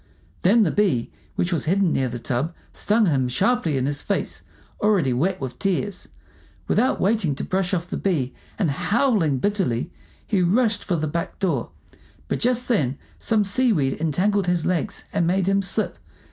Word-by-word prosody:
Then 215 Hz, +5 st, +5 dB
the 170 Hz, -, +1 dB
bee 185 Hz, -, +1 dB, 0.2 s
which 175 Hz, +1 st, 0 dB
was 165 Hz, -, -1 dB
hidden 185 Hz, +1 st, +2 dB
near 130 Hz, -1 st, 0 dB
the 120 Hz, -, -5 dB
tub 130 Hz, +8 st, -2 dB, 0.2 s
stung 215 Hz, +1 st, +2 dB
him 135 Hz, -7 st, +2 dB
sharply 185 Hz, -, +1 dB
in 130 Hz, -, 0 dB
his 145 Hz, +1 st, -1 dB
face, -, -, -2 dB, 0.4 s
already 195 Hz, -11 st, +2 dB
wet 180 Hz, +9 st, 0 dB
with 125 Hz, -2 st, -6 dB
tears. 195 Hz, +1 st, -1 dB, 0.6 s
Without 255 Hz, +4 st, +2 dB
waiting 190 Hz, -8 st, +1 dB
to -, -, -5 dB
brush 190 Hz, 0 st, -1 dB
off 175 Hz, -2 st, -1 dB
the -, -, -4 dB
bee, 145 Hz, -10 st, -1 dB, 0.2 s
and 170 Hz, -8 st, +1 dB
howling 180 Hz, -, +1 dB
bitterly, 180 Hz, -, 0 dB, 0.3 s
he 200 Hz, -4 st, +1 dB
rushed 215 Hz, +5 st, +2 dB
for 180 Hz, -, -1 dB
the 155 Hz, -1 st, -1 dB
back 165 Hz, +2 st, -3 dB
door; 165 Hz, -, -1 dB, 0.6 s
but -, -, -1 dB
just 250 Hz, 0 st, +1 dB
then 145 Hz, -, +1 dB, 0.2 s
some 215 Hz, -2 st, +2 dB
seaweed 195 Hz, -, +2 dB
entangled 185 Hz, +5 st, +1 dB
his 175 Hz, -2 st, +1 dB
legs 175 Hz, -5 st, -1 dB
and 170 Hz, -, +1 dB
made 185 Hz, +1 st, +2 dB
him 195 Hz, 0 st, +3 dB
slip. 205 Hz, +3 st, -1 dB
180 Hz, 175 wpm, -23 LUFS, 145-205 Hz, 0.6 s, Then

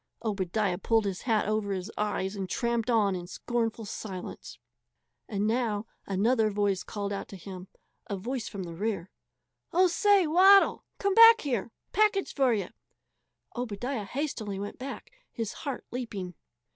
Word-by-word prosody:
Obadiah 195 Hz, -2 st, 0 dB
pulled 225 Hz, +1 st, +2 dB
his 195 Hz, -2 st, -3 dB
hat 220 Hz, -5 st, +1 dB
over 215 Hz, -1 st, 0 dB
his 190 Hz, +2 st, -3 dB
eyes 205 Hz, -2 st, -1 dB
and 190 Hz, -2 st, -4 dB
tramped 235 Hz, +1 st, -1 dB
on 210 Hz, -5 st, +3 dB
in 175 Hz, -1 st, -6 dB
scornful 230 Hz, +2 st, -2 dB
silence. 190 Hz, -3 st, -7 dB, 0.7 s
And 200 Hz, 0 st, -1 dB
now 220 Hz, -2 st, 0 dB, 0.2 s
another 215 Hz, +3 st, +2 dB
voice 200 Hz, -2 st, 0 dB
called 205 Hz, -1 st, -4 dB
out 200 Hz, -, -4 dB
to -, -, -10 dB
him, 185 Hz, 0 st, -9 dB, 0.4 s
a 200 Hz, -, -3 dB
voice 235 Hz, +4 st, -4 dB
from 195 Hz, -2 st, -5 dB
the 170 Hz, -1 st, -7 dB
rear: 195 Hz, 0 st, -3 dB, 0.6 s
"Oh, 365 Hz, +2 st, +5 dB
say! 395 Hz, +1 st, +4 dB
Waddle! 380 Hz, +5 st, +6 dB
Come 400 Hz, -1 st, +1 dB
back 455 Hz, +2 st, +9 dB
here 240 Hz, -8 st, -1 dB, 0.2 s
package 420 Hz, -2 st, +2 dB
for 270 Hz, -3 st, +3 dB
ye!" 200 Hz, -5 st, -1 dB, 0.9 s
Obadiah 245 Hz, 0 st, -3 dB
hastily 220 Hz, -5 st, -3 dB
went 205 Hz, +1 st, -6 dB
back, 270 Hz, +2 st, -7 dB, 0.2 s
his 225 Hz, -3 st, -4 dB
heart 280 Hz, -5 st, -5 dB
leaping. 205 Hz, -8 st, -5 dB
215 Hz, 150 wpm, -29 LUFS, 195-250 Hz, 0.9 s, back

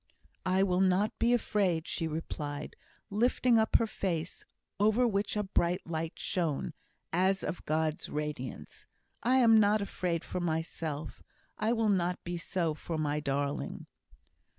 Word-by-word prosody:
"I 185 Hz, +1 st, +3 dB
will 185 Hz, -1 st, +2 dB
not 190 Hz, +3 st, +3 dB
be 235 Hz, -, +3 dB
afraid," 195 Hz, -8 st, +1 dB
she 165 Hz, -, -1 dB
replied, 150 Hz, -2 st, -5 dB, 0.4 s
lifting 235 Hz, +2 st, +3 dB
up 220 Hz, -, +1 dB
her 230 Hz, -, +6 dB
face, 180 Hz, -6 st, -3 dB, 0.4 s
over 220 Hz, +4 st, +4 dB
which 205 Hz, -1 st, 0 dB
a 210 Hz, -, +1 dB
bright 180 Hz, -2 st, 0 dB
light 165 Hz, 0 st, -3 dB
shone, 165 Hz, -4 st, -1 dB, 0.4 s
as 190 Hz, +2 st, +2 dB
of 175 Hz, -, -4 dB
God's 155 Hz, 0 st, 0 dB
radiance. 145 Hz, -, -5 dB, 0.3 s
"I 250 Hz, +2 st, +3 dB
am 230 Hz, -4 st, +7 dB
not 210 Hz, 0 st, +4 dB
afraid 180 Hz, -4 st, -2 dB
for -, -, -4 dB
myself. 160 Hz, -2 st, -3 dB, 0.4 s
I 220 Hz, +2 st, +2 dB
will 225 Hz, -2 st, +2 dB
not 180 Hz, -2 st, +1 dB
be 175 Hz, 0 st, -4 dB
so 170 Hz, -1 st, -1 dB
for 160 Hz, +1 st, -5 dB
my 150 Hz, -1 st, 0 dB
darling." 140 Hz, 0 st, -2 dB
180 Hz, 145 wpm, -31 LUFS, 160-210 Hz, 0.4 s, am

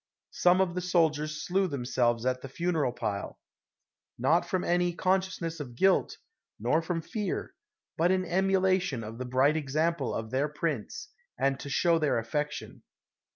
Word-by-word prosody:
Some 180 Hz, +1 st, +4 dB
of 180 Hz, -2 st, +1 dB
the 180 Hz, -, -2 dB
soldiers 155 Hz, -4 st, +1 dB
slew 190 Hz, +1 st, +1 dB
themselves 125 Hz, -4 st, 0 dB
at 130 Hz, 0 st, 0 dB
the 135 Hz, -, -8 dB
funeral 160 Hz, -3 st, 0 dB
pile, 100 Hz, -4 st, -4 dB, 0.8 s
not 155 Hz, +8 st, +2 dB
from 185 Hz, -2 st, 0 dB
any 175 Hz, 0 st, +1 dB
consciousness 185 Hz, -3 st, 0 dB
of 125 Hz, -5 st, -7 dB
guilt, 190 Hz, +8 st, +2 dB, 0.4 s
nor 125 Hz, +9 st, +2 dB
from 165 Hz, 0 st, -3 dB
fear, 210 Hz, -2 st, -3 dB, 0.5 s
but 170 Hz, +2 st, +4 dB
in 185 Hz, 0 st, +2 dB
emulation 185 Hz, -6 st, +1 dB
of 110 Hz, +2 st, -8 dB
the 130 Hz, -, -3 dB
bright 130 Hz, +4 st, +3 dB
example 155 Hz, 0 st, 0 dB
of 110 Hz, 0 st, -4 dB
their 135 Hz, +3 st, +1 dB
prince, 150 Hz, -, -3 dB, 0.3 s
and 135 Hz, -1 st, +1 dB
to 140 Hz, -, -7 dB
show 165 Hz, +4 st, +3 dB
their 150 Hz, -5 st, +1 dB
affection. 145 Hz, +6 st, -3 dB
160 Hz, 155 wpm, -29 LUFS, 130-180 Hz, 0.8 s, Some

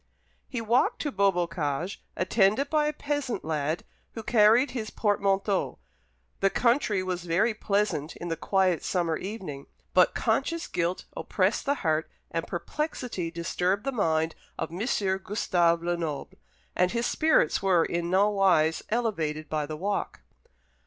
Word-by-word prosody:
He 250 Hz, -4 st, -3 dB
walked 230 Hz, +3 st, +2 dB
to 295 Hz, -, -2 dB
Beaubocage, 175 Hz, -4 st, 0 dB, 0.2 s
attended 210 Hz, -, +2 dB
by 305 Hz, -1 st, +3 dB
a -, -, +1 dB
peasant 290 Hz, -, -3 dB
lad, 155 Hz, +1 st, -1 dB, 0.3 s
who 225 Hz, -, -6 dB
carried 230 Hz, +4 st, +5 dB
his 220 Hz, -4 st, -4 dB
portmanteau. 200 Hz, -2 st, 0 dB, 0.6 s
The 195 Hz, -, +3 dB
country 235 Hz, -4 st, +2 dB
was 180 Hz, -1 st, -3 dB
very 190 Hz, +7 st, +2 dB
pleasant 200 Hz, -8 st, -1 dB
in 175 Hz, -, -6 dB
the 165 Hz, -, -1 dB
quiet 185 Hz, -1 st, +1 dB
summer 170 Hz, -3 st, 0 dB
evening, 185 Hz, -8 st, -6 dB, 0.3 s
but -, -, +5 dB
conscious 335 Hz, 0 st, 0 dB
guilt 175 Hz, +1 st, -2 dB
oppressed -, -, 0 dB
the 285 Hz, -, +3 dB
heart 155 Hz, 0 st, +1 dB, 0.2 s
and 165 Hz, 0 st, -2 dB
perplexity 240 Hz, -, -3 dB
disturbed 180 Hz, +4 st, -1 dB
the 275 Hz, -, -1 dB
mind 160 Hz, -8 st, +1 dB, 0.2 s
of -, -, -3 dB
M. 175 Hz, -, -6 dB, 0.4 s
Gustave 170 Hz, -5 st, +1 dB
Lenoble, 170 Hz, -5 st, -3 dB, 0.4 s
and 180 Hz, 0 st, +3 dB
his 235 Hz, 0 st, 0 dB
spirits 315 Hz, -, +2 dB
were 185 Hz, -4 st, +3 dB
in 170 Hz, 0 st, -2 dB
nowise 190 Hz, -4 st, +3 dB
elevated 160 Hz, -10 st, -1 dB
by 150 Hz, -2 st, -1 dB
the 155 Hz, 0 st, -5 dB
walk. 200 Hz, +5 st, -2 dB
190 Hz, 140 wpm, -27 LUFS, 165-225 Hz, 0.6 s, carried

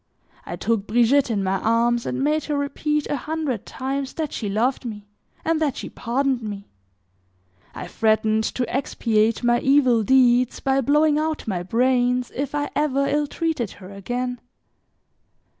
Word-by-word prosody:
I -, -, -4 dB
took 225 Hz, -3 st, -1 dB
Brigitte 245 Hz, +5 st, +3 dB
in 205 Hz, -4 st, 0 dB
my 190 Hz, 0 st, 0 dB
arms, 235 Hz, +2 st, +1 dB
and 260 Hz, +1 st, -2 dB
made 305 Hz, +1 st, +1 dB
her 295 Hz, -2 st, -1 dB
repeat 300 Hz, +1 st, -1 dB
a -, -, -2 dB
hundred 295 Hz, -5 st, -3 dB
times 270 Hz, +1 st, -4 dB
that 315 Hz, -3 st, -4 dB
she 210 Hz, -, -3 dB
loved 235 Hz, +8 st, 0 dB
me, 210 Hz, -4 st, -7 dB, 0.4 s
and 320 Hz, -1 st, +1 dB
that 290 Hz, -5 st, 0 dB
she -, -, -6 dB
pardoned 260 Hz, +1 st, -1 dB
me. 205 Hz, -2 st, -7 dB, 1.0 s
I -, -, -6 dB
threatened 220 Hz, 0 st, +1 dB
to 250 Hz, -2 st, -1 dB
expiate 225 Hz, -4 st, 0 dB
my 240 Hz, 0 st, +3 dB
evil 260 Hz, -4 st, +4 dB
deeds 250 Hz, +1 st, +3 dB
by 270 Hz, 0 st, +1 dB
blowing 295 Hz, +3 st, +3 dB
out 310 Hz, -3 st, -2 dB
my 185 Hz, -5 st, -1 dB
brains, 250 Hz, +4 st, +1 dB
if 280 Hz, +2 st, -3 dB
I 290 Hz, 0 st, -2 dB
ever 280 Hz, -2 st, +1 dB
ill 295 Hz, +1 st, 0 dB
treated 300 Hz, -, -2 dB
her 185 Hz, 0 st, -12 dB
again. 245 Hz, +5 st, -4 dB
250 Hz, 160 wpm, -23 LUFS, 225-285 Hz, 1.0 s, evil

